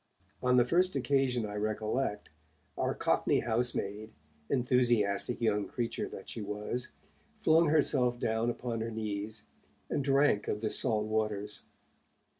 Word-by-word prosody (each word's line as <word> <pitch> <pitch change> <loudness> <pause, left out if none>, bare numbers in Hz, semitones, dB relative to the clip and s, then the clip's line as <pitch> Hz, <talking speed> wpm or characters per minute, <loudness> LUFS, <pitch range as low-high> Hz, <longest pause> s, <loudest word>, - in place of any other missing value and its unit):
On 125 0 +3
the 120 - +5
first 180 +5 +2
occasion 130 -3 +1
I 105 - -6
recollect, 110 +1 -2 0.4
our - - -1
Cockney - - +2
housemaid, 110 -3 -1 0.4
enthusiastic 120 -4 +1
young 105 -3 +1
creature 120 +2 -3
that - - -9
she 115 - -5
was, 105 +4 -3 0.5
flung 160 +1 +4
herself 135 -5 +3
down 110 +1 0
upon 120 -1 -3
her 115 - -2
knees, 110 -1 -4 0.5
and 140 - 0
drank 135 -6 +3
of 105 - -2
the 110 - -1
salt 105 -2 +3
waters. 105 -1 -2
115 Hz, 130 wpm, -31 LUFS, 105-125 Hz, 0.5 s, the